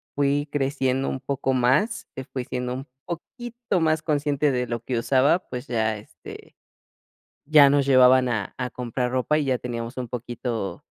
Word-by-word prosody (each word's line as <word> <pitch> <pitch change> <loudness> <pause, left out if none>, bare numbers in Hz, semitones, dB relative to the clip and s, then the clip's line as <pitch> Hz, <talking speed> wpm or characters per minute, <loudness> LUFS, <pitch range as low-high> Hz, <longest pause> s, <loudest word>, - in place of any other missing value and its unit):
fui 145 +1 +1
creciendo 135 -2 0
un 130 - -3
poco 135 -1 -1
más, 155 - +1
que 130 - -6
fui 130 -1 -5
siendo 125 0 -3
un 135 +2 -6 0.2
poquito 235 +4 -4
más 155 -1 +1
consciente 145 -1 +1
de 125 -1 -1
lo 120 0 -3
que 125 0 -2
usaba, 135 +8 +3
pues 125 +2 -5
ya, 110 -2 0
este, 105 - -13 0.9
ya 145 -2 +7
nos 140 -1 +3
llevaban 130 -1 +6
a 110 -5 -3
a 125 0 -3
comprar 125 0 -3
ropa 130 +4 +1
y 145 - -1
ya 130 -2 0
teníamos 120 0 -5
un 125 -2 -3
poquito 120 -3 -4
130 Hz, 170 wpm, -24 LUFS, 125-145 Hz, 0.9 s, ya